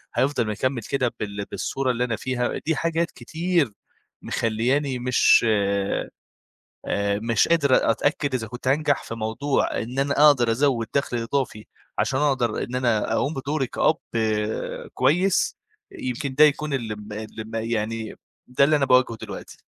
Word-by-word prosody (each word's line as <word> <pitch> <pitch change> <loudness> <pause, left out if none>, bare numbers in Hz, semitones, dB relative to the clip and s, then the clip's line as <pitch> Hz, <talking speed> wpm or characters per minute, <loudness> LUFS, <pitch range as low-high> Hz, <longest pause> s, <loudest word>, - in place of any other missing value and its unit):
هيفضل 130 -1 +1
مكمّل 120 +4 -1
كده 130 -1 -1
بال 100 -1 -4
بالصورة 135 -1 -1
اللي 125 0 -1
أنا 120 -2 -1
فيها؟ 125 +1 -2
دي 160 +1 +1
حاجات 165 +2 0
كتير 170 -5 -1 0.5
مخلّياني 125 +4 0
مش 125 -1 +4
آآ، 100 -2 0 1.1
مش 115 -2 +2
قادر 140 -8 +3
أتأكد 145 +3 0
إذا 115 -3 -1
كُنت 125 +3 -5
هانجح 145 +1 +2
في - - -6
موضوع 115 +6 -1
إن 125 +4 -6
أنا 140 +1 +1
أقدر 125 -6 +5
أزود 120 -1 +1
دخل 140 -3 0
إضافي 115 -2 -2 0.3
عشان 130 - +1
أقدر 135 -6 +1
إن 125 - -5
أنا 120 -4 +1
أقوم 145 - 0
بدوري 135 0 -1
كأب 155 - +1 1.0
كويس، 180 +5 +2 0.4
يمكن 130 +2 -4
ده 150 +3 +7
يكون 150 0 +2
الم 110 -5 -4
الم 110 +1 -7
يعني 115 -1 -2 0.4
ده 125 +2 +4
اللي 150 +2 +4
أنا 140 - +2
باواجهه 125 -3 +3
دلوقتي. - - -8
125 Hz, 145 wpm, -24 LUFS, 115-140 Hz, 1.1 s, ده